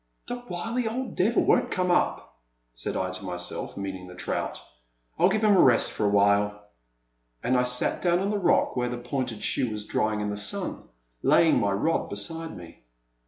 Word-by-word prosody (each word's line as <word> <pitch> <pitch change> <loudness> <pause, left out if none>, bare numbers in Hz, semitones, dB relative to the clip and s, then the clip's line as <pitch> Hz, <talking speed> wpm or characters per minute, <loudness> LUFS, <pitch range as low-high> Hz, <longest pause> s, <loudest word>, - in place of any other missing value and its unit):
The 245 0 -6
wily 225 +7 -2
old 250 +4 -3
devil 215 +6 +2
won't - - +3
come 180 -1 0
up, 175 - 0 0.3
said - - -3
I 95 0 -1
to 95 - -5
myself, 90 0 -4
meaning 95 -2 -5
the 90 - -11
trout; 90 - -3 0.6
I - - +5
*11 190 - +4
give 215 +2 0
him 210 -2 +5
a - - +4
rest 125 -4 +4
for 105 - 0
a - - +3
while.'* 100 0 +3 0.8
And 130 - +1
I 125 0 +3
sat 125 0 0
down 175 -1 +3
on 195 +3 -1
the 210 - 0
rock 180 - +2
where 125 -1 0
the 125 - -4
pointed 125 -2 -4
shoe 125 - +1
was 105 -1 -5
drying 110 0 0
in 105 0 -2
the 105 - -4
sun, 100 0 -3 0.3
laying 165 -6 +4
my 100 -4 +1
rod 155 +12 0
beside 160 +11 -3
me. 85 -7 -13
125 Hz, 200 wpm, -26 LUFS, -, 0.8 s, I